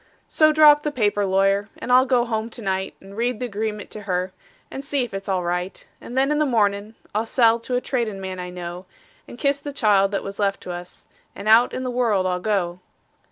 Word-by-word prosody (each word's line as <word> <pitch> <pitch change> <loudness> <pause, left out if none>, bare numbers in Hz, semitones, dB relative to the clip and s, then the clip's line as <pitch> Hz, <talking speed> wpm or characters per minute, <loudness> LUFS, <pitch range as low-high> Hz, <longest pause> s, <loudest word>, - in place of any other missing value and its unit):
So 310 -1 +4
draw 305 -1 +8
up 295 0 +1
the 300 - -2
paper, 205 -6 +1
lawyer, 195 +2 +2
and 250 - -5
I'll 255 +1 +6
go 250 -2 +2
home 225 -1 -2
to 235 - -7
night, 190 0 -2
And 195 +1 -13
read 235 0 -1
the 250 - -2
agreement 210 -1 -4
to 215 - -7
her, 180 +1 -1 0.4
and 270 - -6
see 280 -1 0
if 240 - -7
it's 195 0 -6
all 185 -2 0
right; 180 +2 -3
And 245 - -8
then, 270 +2 +3
in 300 - +1
the 305 - +3
mornin', 210 -2 0 0.2
I'll 220 +2 -1
sell 230 -1 +3
to 250 +2 -4
a 250 - +1
tradin' 230 -7 -2
man 190 -1 -6
I 180 0 -5
know, 180 +1 -7 0.4
And - - -11
kiss 280 +1 +1
the 290 - -6
child 205 -7 +3
that 200 - -1
was 195 +1 -7
left 200 -1 0
to 180 - -7
us, 175 0 -9 0.3
and 210 - -7
out 225 +3 +6
in 255 - -4
the 255 - -2
world 225 -6 +1
I'll 180 -1 0
go. 180 -3 -1
215 Hz, 240 wpm, -22 LUFS, 195-250 Hz, 0.4 s, draw